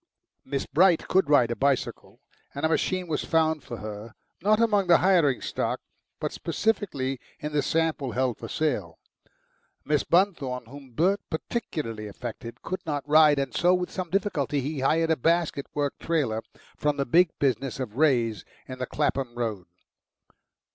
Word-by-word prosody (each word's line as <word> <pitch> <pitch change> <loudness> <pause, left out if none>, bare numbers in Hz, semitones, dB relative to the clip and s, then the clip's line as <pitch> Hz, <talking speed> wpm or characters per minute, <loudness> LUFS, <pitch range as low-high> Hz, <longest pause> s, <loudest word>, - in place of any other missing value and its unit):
Miss 135 0 -3
Bright 175 0 +3
could 190 -5 +2
ride 125 -5 +5
a - - -1
bicycle, 135 -1 -1 0.3
and 140 +3 -1
a - - +2
machine 185 +2 0
was 155 -2 -1
found 160 -2 +1
for 120 - -7
her, 105 +2 -8 0.3
not 210 +4 +3
among 210 -4 +3
the 170 - +7
hiring 170 -8 +3
stock, - - -2 0.4
but - - -2
specially, 140 - -1 0.2
in 150 - -4
the 150 -1 +1
sample 160 -6 0
held 130 -2 0
for - - -6
sale. 105 - -2 0.9
Miss 150 -1 +1
Bunthorne, 160 - +1
whom 135 +1 -13
Bert 190 - +2
particularly 155 - -4
affected, 115 +2 -8
could 185 - -4
not 145 -2 -3
ride, 150 -1 +6
and 135 -3 -2
so 180 +1 +4
with 180 0 -3
some 185 -2 -4
difficulty 165 -7 0
he 140 +2 -3
hired 160 +5 +2
a - - +4
basket 165 -1 0
work 145 -1 0
trailer 135 -10 0 0.3
from 150 -1 0
the 140 - 0
big 170 +7 +4
business 135 -1 0
of 120 -5 -5
Wray's 120 - +2 0.2
in 130 -1 -8
the 130 - -3
Clapham 135 -5 -1
Road. 110 -7 -3
145 Hz, 160 wpm, -26 LUFS, 125-165 Hz, 0.9 s, the